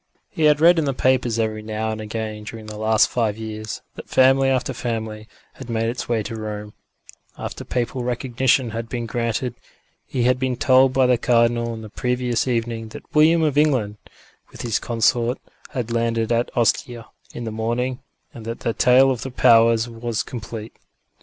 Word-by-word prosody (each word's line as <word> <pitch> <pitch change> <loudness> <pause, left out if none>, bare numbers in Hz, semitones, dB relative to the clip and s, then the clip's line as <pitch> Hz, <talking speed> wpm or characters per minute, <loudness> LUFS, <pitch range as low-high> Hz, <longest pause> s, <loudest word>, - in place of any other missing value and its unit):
He 160 - 0
had 150 -1 +5
read 170 +1 +6
in 155 - 0
the 135 -2 -1
papers 130 -3 +1
every 110 -1 -1
now 110 +1 -3
and 110 0 -5
again 110 0 -5
during 110 0 -8
the 105 0 -8
last 110 0 +3
five 110 -4 -1
years 110 -1 -6
that - - -11
family 135 +1 +4
after 130 0 0
family 110 -3 -4 0.3
had 130 -2 -11
made 115 0 0
its 120 - -6
way 115 -3 +1
to 115 +2 -6
Rome, 105 -1 -6 0.6
after - - -6
papal 125 +1 -2
recognition 125 0 +1
had 115 +1 -5
been 120 -1 -3
granted; 115 +1 -2 0.5
he 125 - -1
had 125 +1 +2
been 130 -1 0
told 130 +1 +4
by 130 0 +3
the 125 -2 +3
Cardinal 115 -1 +2
on 110 -1 -7
the 110 - -9
previous 125 +1 -1
evening 115 -2 -2
that - - -12
William 160 +2 +5
of 145 -2 +2
England, 125 -9 +1 0.5
with - - -9
his 115 -2 0
Consort, 120 +2 +1 0.3
had 120 -3 -4
landed 115 -1 0
at 120 +1 +1
Ostia 120 0 0 0.3
in 120 - -5
the 110 - -4
morning 120 +4 -2 0.3
and 115 - -10
that 115 +1 -6
the 115 - -1
tale 130 +3 +5
of 125 - -3
the 135 - -4
Powers 115 -2 +4
was 115 -1 -3
complete. 110 -2 -7
115 Hz, 185 wpm, -22 LUFS, 110-125 Hz, 0.6 s, read